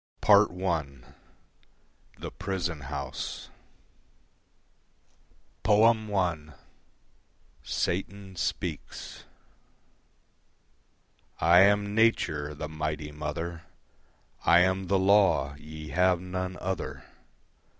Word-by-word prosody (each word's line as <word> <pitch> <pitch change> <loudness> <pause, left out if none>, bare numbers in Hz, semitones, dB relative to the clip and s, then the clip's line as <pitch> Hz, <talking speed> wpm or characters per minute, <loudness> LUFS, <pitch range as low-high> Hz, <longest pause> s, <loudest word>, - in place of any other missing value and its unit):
Part 105 0 +6
I 85 -5 0 1.3
The - - -7
Prison 85 -4 -3
House 70 -2 -5 2.1
I. 105 -7 +2 1.1
Satan 95 +1 -3
Speaks - - -5 2.1
I 85 +2 +6
am 100 +1 +4
Nature, 75 -10 +1
the 75 +1 -5
Mighty 75 -1 -4
Mother, 80 +3 -5 0.8
I 85 +1 +6
am 95 +1 +1
the 95 - +2
law: 95 -7 +3
ye 75 0 -9
have 90 +4 +3
none 90 0 -4
other. 95 +1 -4
90 Hz, 75 wpm, -28 LUFS, 75-100 Hz, 2.1 s, Part